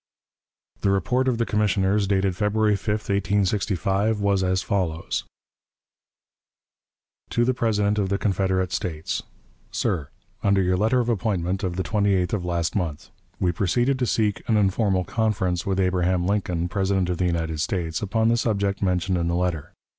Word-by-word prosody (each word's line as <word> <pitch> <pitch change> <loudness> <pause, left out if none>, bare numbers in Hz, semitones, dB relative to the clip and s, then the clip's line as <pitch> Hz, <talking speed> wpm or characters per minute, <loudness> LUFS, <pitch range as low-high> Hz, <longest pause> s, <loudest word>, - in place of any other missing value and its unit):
The 100 - +1
report 125 +7 +1
of 125 -3 +1
the 115 - +1
commissioners, 100 -1 +1
dated 95 -2 +1
February 105 +1 +2
5, 100 - -9
1865, 100 0 0
was 100 -1 +2
as 95 0 +1
follows: 85 -5 -2 2.0
"To 120 - +1
the 130 - +2
President 105 -3 +1
of 95 -2 0
the 100 - +1
Confederate 95 -2 0
States: 80 -4 -3 0.5
"SIR: 75 -6 -1 0.3
Under 100 -1 +3
your 90 0 +2
letter 110 +6 +2
of 120 - -3
appointment 95 -4 -1
of 90 -2 -1
the 95 - -1
28th 100 -4 +1 0.5
ult. 80 0 -8 0.3
We 90 -2 +2
proceeded 120 +9 +1
to 125 - +1
seek 105 -3 +1
'an 110 - +4
informal 95 -1 +2
conference' 100 -5 -1
with 95 -1 0
Abraham 90 -1 +1
Lincoln, 90 -4 0
President 95 0 0
of 90 - -3
the 90 - +2
United 80 -2 -2
States, 85 -2 -2
upon 110 +2 +1
the 120 - +3
subject 100 -4 0
mentioned 90 -1 +1
in 85 - 0
the 85 - 0
letter. 90 -4 -1
95 Hz, 155 wpm, -24 LUFS, 90-105 Hz, 2.0 s, an